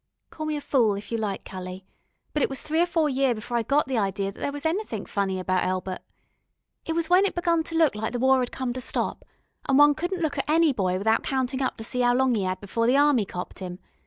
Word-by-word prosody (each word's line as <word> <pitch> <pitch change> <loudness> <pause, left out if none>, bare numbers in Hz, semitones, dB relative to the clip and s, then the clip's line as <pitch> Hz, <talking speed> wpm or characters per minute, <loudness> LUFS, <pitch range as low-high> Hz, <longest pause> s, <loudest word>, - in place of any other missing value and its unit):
Call 310 -1 -5
me 305 -1 -1
a - - -5
fool 235 -7 +2
if 200 +3 -8
you 230 - -1
like, 205 -3 -3
cully, 185 0 -7 0.5
but 300 - 0
it - - +2
was 270 - -5
three 315 +2 +1
or 350 - +3
four 330 -3 +1
year 270 -3 +1
before 225 +3 -5
I 235 - +3
got 280 +6 +1
the 260 -3 0
idee 195 -1 -1
that - - -16
there 285 - -2
was 290 +1 -8
anythink 320 - -2
funny 195 -2 -1
about 185 0 0
Elbert. 185 0 -2 0.9
It 325 - 0
was 330 0 -1
when 360 +3 +5
it 400 - 0
begun 340 -1 +2
to 330 - -5
look 320 -8 +4
as 215 +1 -3
if - - -2
the 245 - -2
War 260 +1 +4
'ad 245 - -2
come 255 -2 -3
to 255 - -5
stop, - - -2 0.5
an' 270 - +4
one 290 0 +7
couldn't 350 +3 -3
look 290 -2 -1
at 275 - -3
any 320 -1 +4
boy 185 -5 0
without 220 +4 +2
countin' 260 0 -1
up 260 - -1
to 225 - -7
see 250 +2 -2
'ow 245 0 +3
long 260 -1 +3
'e 205 - 0
'ad 185 0 -2
before 230 +4 -1
the 255 +3 +4
Army 285 -7 +4
copped 180 +1 -7
'im. 180 -1 -5
255 Hz, 270 wpm, -25 LUFS, 200-295 Hz, 0.9 s, one